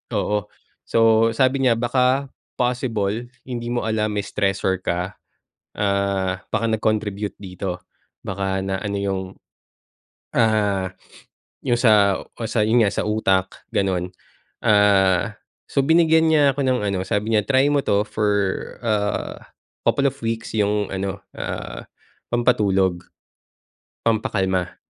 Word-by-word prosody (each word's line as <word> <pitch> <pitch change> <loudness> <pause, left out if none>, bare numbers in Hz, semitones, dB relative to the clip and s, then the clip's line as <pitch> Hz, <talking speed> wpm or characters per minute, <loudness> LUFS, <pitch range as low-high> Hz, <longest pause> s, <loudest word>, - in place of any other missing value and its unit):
oo, 105 -1 0 0.4
so 115 0 +4
sabi 130 +1 +3
niya 125 -3 +4
baka 130 +3 +1 0.3
possible 120 -3 -1 0.2
hindi 120 -2 -4
mo 120 -2 -1
alam 110 -1 0
may 100 -1 -2
stressor 95 -2 0
ka, 90 +3 -2 0.6
ah 100 -2 0
baka 115 - 0
nag-contribute 105 -2 -1
dito, 90 -2 -6 0.4
baka 95 -1 -2
na 95 0 -2
ano 100 -1 -2
'yong, 95 -1 -1 1.1
ah, 105 -4 +2 0.7
yung 120 -2 +1
sa 105 -4 +4
o 115 - -9
sa 110 0 0
yun 110 +2 +4
nga 100 - +1
sa - - -2
utak, 95 -3 0
ganon. 90 -2 0 0.5
Ah, 105 0 +3 0.3
so 140 - +1
binigyan 160 +1 +4
niya 145 -3 +4
ako - - -2
ng 130 -2 +2
ano, 95 - -1
sabi 105 +4 0
niya 110 - +4
try 135 +3 +3
mo 145 - +3
'to 105 -4 +1
for 105 0 -1 0.6
ah, 105 -2 -1 0.4
couple 140 - +2
of 135 - -6
weeks 115 0 -3
yung 105 -1 +1
ano, 95 +1 -3 0.2
ah, - - -5 0.5
pampatulog, 100 -7 +2 1.0
pampakalma. 95 -5 0
105 Hz, 125 wpm, -22 LUFS, 95-120 Hz, 1.1 s, so